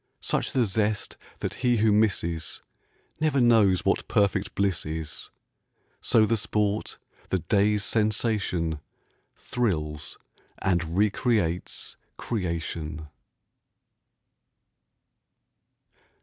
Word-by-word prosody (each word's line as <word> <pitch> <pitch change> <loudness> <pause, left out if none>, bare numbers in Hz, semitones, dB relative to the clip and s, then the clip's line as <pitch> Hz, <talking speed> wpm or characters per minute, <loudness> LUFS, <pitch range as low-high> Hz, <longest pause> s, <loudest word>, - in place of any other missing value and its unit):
Such - - 0
the 125 -3 +2
zest 105 +1 0 0.3
that - - -2
he 125 -2 +3
who 110 0 +4
misses 95 -6 0 0.6
Never 155 -3 +2
knows 110 -7 +4
what - - +1
perfect 100 -1 +1
bliss 100 -4 +1
is. 80 -1 -5 0.7
So 110 -1 +4
the 115 +1 +1
sport, 105 0 -1 0.3
the 95 - +2
day's 100 +3 +2
sensation, 105 -8 0 0.6
Thrills 75 -11 -2 0.4
and 85 -2 0
recreates 105 -4 0 0.2
creation. 85 -6 -3
100 Hz, 85 wpm, -26 LUFS, 85-110 Hz, 0.7 s, who